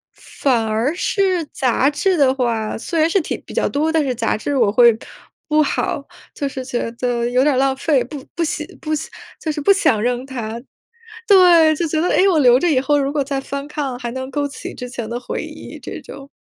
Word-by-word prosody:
反 245 -5 -1
而 225 +7 0
是 370 -2 0
杂 265 0 +1
志 370 +5 +1
的 275 -4 +4
话， 230 -4 -1
虽 330 +8 -3
然 315 +1 +4
是 390 - +3
挺 310 - -4
比 - - -11
较 - - 0
多， 305 +3 0
但 320 -1 +2
是 260 -2 -1
杂 230 -1 0
志 280 +6 -3
我 230 -6 +3
会 235 +1 +5 0.5
不 305 0 +4
好， 280 -1 -1 0.3
就 285 - -2
是 260 -1 -6
觉 245 -3 -3
得 240 0 -1
有 250 +1 +2
点 290 0 +3
儿 - - +1
浪 270 0 +2
费。 275 -1 +2
不 270 +2 -9
不 340 - 0
喜 305 -1 -3 0.2
不， 310 - -6 0.5
就 315 - -3
是 300 - -3
不 345 +8 +5
想 385 - +2
扔 245 +2 -1
它。 235 -4 -5 0.7
对， 350 -5 +6
就 340 - -1
觉 310 +1 0
得， 350 - +1
哎， - - +3
我 350 -5 +3
留 250 -2 +6
着 350 - +2
以 265 -4 +3
后 290 +2 +2
如 280 0 -1
果 295 - 0
再 275 0 -2
翻 280 +1 -5
看， 280 -4 -4
还 240 -1 -4
能 260 0 -5
勾 290 +1 -1
起 280 - -8
之 250 - -7
前 240 -3 -6
的 240 - -2
回 250 - -5
忆 - - -9
这 - - -7
种。 275 0 -11
275 Hz, 245 characters per minute, -19 LUFS, 245-310 Hz, 0.7 s, 对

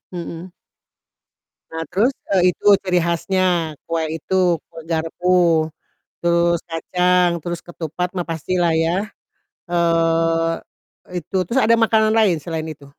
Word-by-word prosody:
Mhm. 170 +1 -7 1.2
Nah 160 0 -4
terus, 235 +8 +2 0.2
eee, 180 -2 +3
itu - - -24 0.2
ciri 180 -2 +1
khasnya, 170 -1 0 0.2
kue 165 -1 0
itu 175 +4 -5 0.4
kue 165 - -10
garpu, 165 0 +2 0.6
terus 170 0 +2
kacang, 180 +2 +2
terus 175 +1 -5
ketupat 175 +1 -4
mah 175 - -1
pastilah 170 +1 0
ya, 170 +5 +1 0.6
eee 165 -1 +2 0.6
e 180 - -4
itu 190 - -4
terus 260 +7 +1
ada 230 +1 +5
makanan 220 -1 +3
lain 195 -7 +4
selain 160 -1 -4
itu? 140 -1 -18
170 Hz, 125 wpm, -20 LUFS, 165-180 Hz, 1.2 s, ada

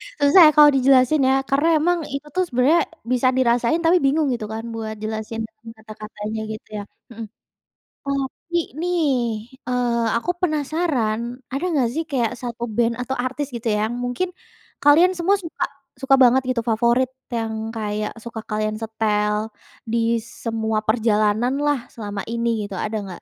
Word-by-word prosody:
Susah 355 -7 +4
ya - - +2
kalau 295 -1 +9
dijelasin 265 +2 +4
ya. 270 0 +3
Karena 285 +4 +2
emang 350 +2 +2
itu 280 +2 -5
tuh 370 - +3
sebenarnya 275 +7 +3 0.3
bisa 255 0 +2
dirasain 245 +5 +2
tapi 340 +2 +4
bingung 295 +2 +2
gitu 225 -3 -4
kan 225 +1 -5
buat 220 -1 -5
jelasin 220 +1 -4
dengan 220 +1 -13
kata-katanya 215 0 -6
gitu 215 - -10
ya? 205 - -4 0.3
Hmm. 225 0 -7 0.8
Tapi 275 +5 -3 0.2
nih, 355 +1 0 0.7
eee, 240 -2 0
aku 350 +9 -1
penasaran, 300 -8 0 0.3
ada 275 +6 -3
nggak 265 -7 +2
sih 325 +3 -1
kayak 240 -5 +1
1 240 -1 -5
band 235 0 +2
atau 265 +2 -3
artis 265 +3 -3
gitu 235 0 -4
ya, 210 -1 +2
yang 240 - -4
mungkin 245 +9 -2 0.5
kalian 315 +6 +6
semua 380 +4 +3
suka 330 - -4 0.4
suka 270 0 +4
banget 255 +2 +5
gitu 250 -2 0
favorit. 235 +3 +2 0.2
Yang 225 -1 -2 0.2
kayak 210 -1 -2
suka 235 -1 -6
kalian 215 0 -2
setel 215 -1 0 0.4
di 230 0 +1
semua 220 -2 -2
perjalananlah 235 +5 +1
selama 205 -3 -5
ini 235 0 0
gitu, 200 -1 -6
ada 215 +1 -3
nggak? 185 -3 -9
240 Hz, 155 wpm, -22 LUFS, 220-280 Hz, 0.8 s, kalau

